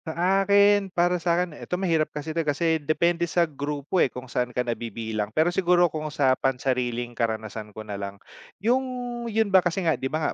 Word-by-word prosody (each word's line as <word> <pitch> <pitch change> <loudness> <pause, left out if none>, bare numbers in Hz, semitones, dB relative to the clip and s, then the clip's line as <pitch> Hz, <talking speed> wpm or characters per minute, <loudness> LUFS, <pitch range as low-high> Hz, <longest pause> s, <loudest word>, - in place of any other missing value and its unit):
Sa 160 0 -5 0.2
akin, 200 0 +4
para 175 0 +1
sa'kin, 170 0 0
eto 180 +4 -4
mahirap 165 -5 +1
kasi 150 +1 -5
'to 165 - 0
kasi 160 +1 0
depende 170 +3 +1
sa 170 +1 +3
grupo 145 +3 -2
eh - - +4
kung 125 0 -8
saan 125 0 -2
ka 125 0 -2
nabibilang. 110 -2 -3
Pero 160 +10 +1
siguro 175 -2 +3
kung 155 -1 -3
sa 140 -3 +2
pansariling 125 -2 -1
karanasan 110 -2 -3
ko 110 +1 -9
nalang, 100 -1 -6 0.4
yung 240 +6 +2 0.5
yun 220 -2 0
ba 190 - +8
kasi 180 +1 -1
nga 160 - +4
di 130 - -3
ba 155 +2 -1
155 Hz, 185 wpm, -25 LUFS, 125-175 Hz, 0.5 s, ba